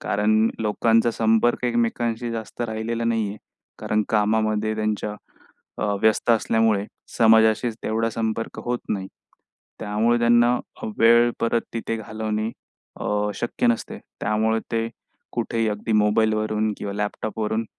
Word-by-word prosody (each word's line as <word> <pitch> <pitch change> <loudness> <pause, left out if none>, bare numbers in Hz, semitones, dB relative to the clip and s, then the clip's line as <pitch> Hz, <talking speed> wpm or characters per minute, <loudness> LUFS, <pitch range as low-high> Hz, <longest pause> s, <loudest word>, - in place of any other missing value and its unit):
कारण 105 +1 +1 0.3
लोकांचा 115 +2 +2
संपर्क 115 +2 +2
एकमेकांशी 120 0 0
जास्त 115 +1 -7
राहिलेला 115 +1 -3
नाही 115 -2 +1
आहे, 100 - -6 0.4
कारण 105 0 +1
कामामध्ये 110 0 +1
त्यांच्या 105 -1 -2 0.6
अ, - - -1 0.2
व्यस्त 110 +2 +3
असल्यामुळे 110 -2 +2 0.3
समाजाशी 110 +1 +5
तेवढा 115 +1 0
संपर्क 115 0 -3
होत 120 0 -1
नाही. 95 -2 -2 0.7
त्यामुळे 110 +3 +1
त्यांना 120 +1 +4 0.4
वेळ 120 +1 +6
परत 115 0 +2
तिथे 115 0 -2
घालवणे 110 0 -3 0.5
अ, 105 0 0
शक्य 120 - -1
नसते. 120 -1 -1 0.2
त्यामुळे 110 +1 +1
ते 115 0 0 0.4
कुठेही 115 -1 -1
अगदी 105 +1 -2
मोबाईलवरून 110 0 +2
किंवा 100 - -4
लॅपटॉपवरून 110 +1 -2
110 Hz, 120 wpm, -23 LUFS, 110-115 Hz, 0.7 s, वेळ